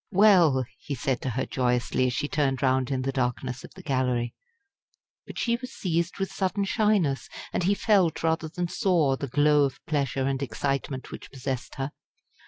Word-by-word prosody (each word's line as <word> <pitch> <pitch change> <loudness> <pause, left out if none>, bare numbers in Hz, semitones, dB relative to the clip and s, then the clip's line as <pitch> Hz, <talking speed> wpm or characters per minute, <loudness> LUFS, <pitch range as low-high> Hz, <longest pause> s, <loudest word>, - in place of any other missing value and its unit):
"Well!" 180 -10 +5
he 140 - -4
said 130 0 -1
to 130 - -2
her 130 +2 -1
joyously, 125 0 +1
as 125 - -1
she 145 - -1
turned 140 -3 0
round 130 -1 +2
in 130 -2 -1
the 135 - 0
darkness 125 -1 -2
of - - -12
the 185 - -11
Gallery. 125 -5 0 0.9
But - - -9
she 235 -1 +1
was 255 +1 -8
seized 170 -1 -1
with 195 -1 -2
sudden 195 +1 0
shyness, 195 - +1 0.2
and - - 0
he 195 +3 +2
felt, 190 -8 +2
rather 160 0 +1
than 175 +2 -2
saw, 170 -7 +2
the 140 - -4
glow 145 +2 +4
of 135 -2 -1
pleasure 140 -3 0
and 135 0 -1
excitement 135 +1 -2
which - - -9
possessed 130 -1 -5
her. 135 +1 -3
140 Hz, 185 wpm, -27 LUFS, 130-175 Hz, 0.9 s, Well